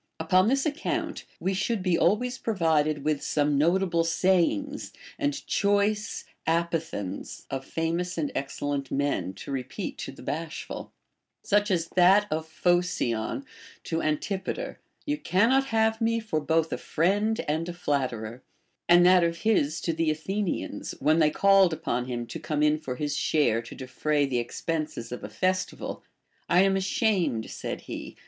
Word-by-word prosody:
Upon 185 +4 +3
this 270 +3 +2
ac 300 -1 -1
count - - -2
we 190 - 0
should 205 +1 -1
be 180 -2 +2
always 245 +9 +1
provided 155 -8 +1
Avith 150 -1 0
some 145 -1 +1
notable 170 +3 +2
sayings 190 - +1 0.3
and 290 0 -1
choice 205 +1 +1 0.2
apothegms 165 - -2
of 135 -1 -3
famous 170 +5 -2
and 150 -3 -1
excellent 140 0 -3
men, 140 -9 -1
to - - -8
repeat 130 -2 -4
to - - -5
the - - -13
bashful, 165 +1 -5 0.3
— - - -56
such 205 +1 +4
as 170 -4 +1
that 190 +3 +5
of 160 +1 -2
Phocion 175 - 0 0.4
to 165 0 -2
Antipater, 190 - -2 0.3
You 295 0 -1
cannot 235 +10 +3
have 220 -1 +1
me 230 0 +2
for 215 -8 -2
both 160 +1 +1
a - - -3
friend 205 +7 +1
and 160 +3 -1
a - - -2
flatterer; 130 -8 -2 0.5
and 175 0 +7
that 180 -1 +6
of 170 0 -1
his 175 -8 +2
to 165 - -1
the 165 0 +1
Athenians, 185 +5 -3
when 155 +2 +3
they 155 -2 +5
called 195 +1 +5
upon 125 -5 -2
him 120 -2 -3
to 165 - -7
come 150 -1 -1
in 150 0 +3
for 130 -5 -5
his 145 +2 -2
share 145 -9 +2
to 115 - -10
defray 145 +3 0
the 130 -3 0
ex 120 - -5
penses 155 -8 -2
of 125 - -6
a 105 - -5
festival; 185 - -2 0.5
I 175 +1 +5
am 195 0 +3
ashamed, 190 - 0
said - - -5
he. - - -8
165 Hz, 160 wpm, -27 LUFS, 150-195 Hz, 0.5 s, and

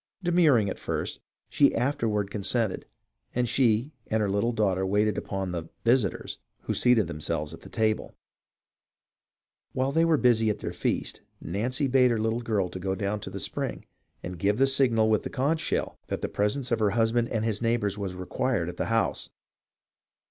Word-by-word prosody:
De 175 - 0
murring 150 - +4
at 95 - -4
first, - - -3 0.3
she - - +3
afterward 110 -7 0
consented, 110 +1 -1 0.5
and 125 0 +1
she 120 +2 +2 0.2
and 110 - 0
her 105 -2 0
little 100 +4 +1
daughter 100 -5 +1
waited 105 +3 +2
upon 95 -2 -3
the 85 -2 -5 0.2
"visitors," 115 -4 +1 0.2
who - - -2
seated 120 -4 +4
themselves 75 -1 -3
at - - -11
the - - -12
table. 110 -1 -1 1.6
While 130 +1 0
they 165 +3 +3
were 165 -2 +4
busy 115 -4 +3
at 105 - 0
their - - -5
feast, - - -2 0.2
Nancy 125 - -1
bade 130 -1 +4
her 115 -2 0
little 110 +2 0
girl 110 -5 0
go 95 +1 -3
down 100 +2 -2
to - - -7
the - - -6
spring - - -4 0.4
and 90 -1 -6
give 100 +3 +1
the 135 - +5
signal 125 -5 +3
with 110 -1 +3
the - - -5
conch 145 +5 0
shell - - -2
that - - -3
the - - -1
presence 120 +6 -1
of 115 - +2
her 105 -2 +3
husband 115 +1 +2
and 110 -1 -1
his 110 -1 -1
neighbours 115 -4 +1
was 100 -3 -4
required 90 +1 -1
at 90 - -8
the - - -1
house. 115 0 0
110 Hz, 185 wpm, -27 LUFS, 100-125 Hz, 1.6 s, the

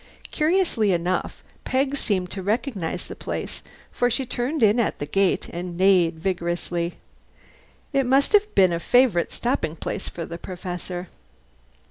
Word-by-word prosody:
Curiously 310 - +2
enough 175 +2 -2 0.2
Peg 270 +2 0
seemed 190 -9 -1
to 195 - -4
recognize 205 - -2
the - - -8
place, - - -5 0.3
for 245 - +1
she 260 +3 -1
turned 250 +4 -1
in 215 +3 +5
at 230 - 0
the 145 - -4
gate 195 +4 +1
and 175 0 -6
neighed 180 -3 +4
vigorously. 175 -1 -2 1.0
It 275 -2 +2
must 270 +8 +3
have 420 0 +4
been 185 -3 +5
a 170 - -1
favourite 240 -4 +3
stopping 235 - -1
place - - -4
for 170 - -6
the 170 +1 -7
Professor. 180 0 -6
195 Hz, 145 wpm, -24 LUFS, 175-250 Hz, 1.0 s, in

